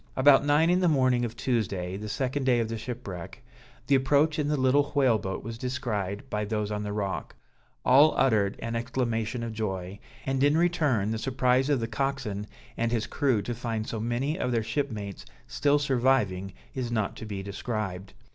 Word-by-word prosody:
About 135 Hz, 0 st, +6 dB
nine 150 Hz, +4 st, +4 dB
in 180 Hz, -, +3 dB
the 180 Hz, -, +3 dB
morning 130 Hz, -5 st, +3 dB
of 115 Hz, 0 st, -6 dB
Tuesday, 95 Hz, -8 st, -1 dB
the 105 Hz, +2 st, -6 dB
second 130 Hz, +5 st, -1 dB
day 125 Hz, -2 st, +3 dB
of 115 Hz, -1 st, -1 dB
the 115 Hz, -, -3 dB
shipwreck, 105 Hz, -8 st, -7 dB, 0.4 s
the -, -, +1 dB
approach 145 Hz, +4 st, +3 dB
in 145 Hz, -, 0 dB
the 150 Hz, 0 st, +1 dB
little 140 Hz, +2 st, +3 dB
whale 130 Hz, -6 st, +4 dB
boat 95 Hz, -1 st, -4 dB
was 115 Hz, +1 st, -6 dB
descried 120 Hz, -3 st, -3 dB
by 105 Hz, -4 st, -2 dB
those 105 Hz, 0 st, -2 dB
on 105 Hz, 0 st, -2 dB
the 105 Hz, 0 st, -4 dB
rock; 100 Hz, -2 st, -3 dB, 0.5 s
all 140 Hz, +5 st, +6 dB
uttered 110 Hz, -7 st, +3 dB
an 115 Hz, 0 st, -3 dB
exclamation 115 Hz, -1 st, -1 dB
of 115 Hz, -1 st, -4 dB
joy, 95 Hz, -3 st, -4 dB, 0.3 s
and 135 Hz, 0 st, 0 dB
in 145 Hz, +2 st, +4 dB
return 150 Hz, -, +2 dB
the 110 Hz, -, -2 dB
surprise 130 Hz, +1 st, +2 dB
of 145 Hz, -3 st, +3 dB
the 115 Hz, -, -1 dB
coxswain 115 Hz, -4 st, -2 dB, 0.3 s
and 115 Hz, 0 st, 0 dB
his 115 Hz, -2 st, 0 dB
crew 125 Hz, -8 st, +1 dB
to 120 Hz, -, -3 dB
find 115 Hz, -2 st, -3 dB
so 110 Hz, -, -4 dB
many 125 Hz, -, -1 dB
of 125 Hz, -, 0 dB
their 115 Hz, -2 st, +1 dB
shipmates 110 Hz, -5 st, -3 dB, 0.2 s
still 145 Hz, 0 st, +2 dB
surviving 120 Hz, -9 st, +1 dB, 0.2 s
is 125 Hz, -3 st, -3 dB
not 110 Hz, -4 st, -1 dB
to -, -, -8 dB
be 100 Hz, -2 st, -5 dB
described. 100 Hz, -2 st, -4 dB
120 Hz, 190 wpm, -28 LUFS, 105-135 Hz, 0.5 s, About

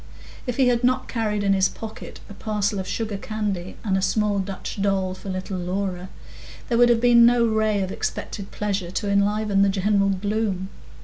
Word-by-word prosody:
If 245 Hz, -, -2 dB
he 265 Hz, -2 st, +4 dB
had 245 Hz, 0 st, +2 dB
not 255 Hz, +1 st, +2 dB
carried 210 Hz, -3 st, -1 dB
in 200 Hz, -1 st, +3 dB
his 190 Hz, -1 st, +3 dB
pocket 220 Hz, -1 st, -9 dB
a -, -, -10 dB
parcel 205 Hz, -1 st, -1 dB
of 190 Hz, -, -4 dB
sugar 220 Hz, -2 st, -3 dB
candy 200 Hz, -4 st, -4 dB
and 200 Hz, -4 st, 0 dB
a 190 Hz, -, +1 dB
small 205 Hz, +1 st, +1 dB
Dutch 195 Hz, +1 st, -5 dB
doll 195 Hz, -2 st, +1 dB
for 190 Hz, +1 st, -9 dB
little 185 Hz, 0 st, -4 dB
Laura, 185 Hz, 0 st, -3 dB, 0.6 s
there 235 Hz, -, +2 dB
would 240 Hz, 0 st, +6 dB
have 235 Hz, -1 st, +4 dB
been 240 Hz, 0 st, +6 dB
no 235 Hz, 0 st, +5 dB
ray 220 Hz, -2 st, +1 dB
of 190 Hz, -, -4 dB
expected 195 Hz, 0 st, -4 dB
pleasure 200 Hz, -4 st, -2 dB
to 200 Hz, +3 st, -2 dB
enliven 200 Hz, 0 st, +2 dB
the 200 Hz, -, +4 dB
general 195 Hz, +1 st, +2 dB
gloom. 195 Hz, -1 st, -1 dB
205 Hz, 190 wpm, -23 LUFS, 190-220 Hz, 0.6 s, would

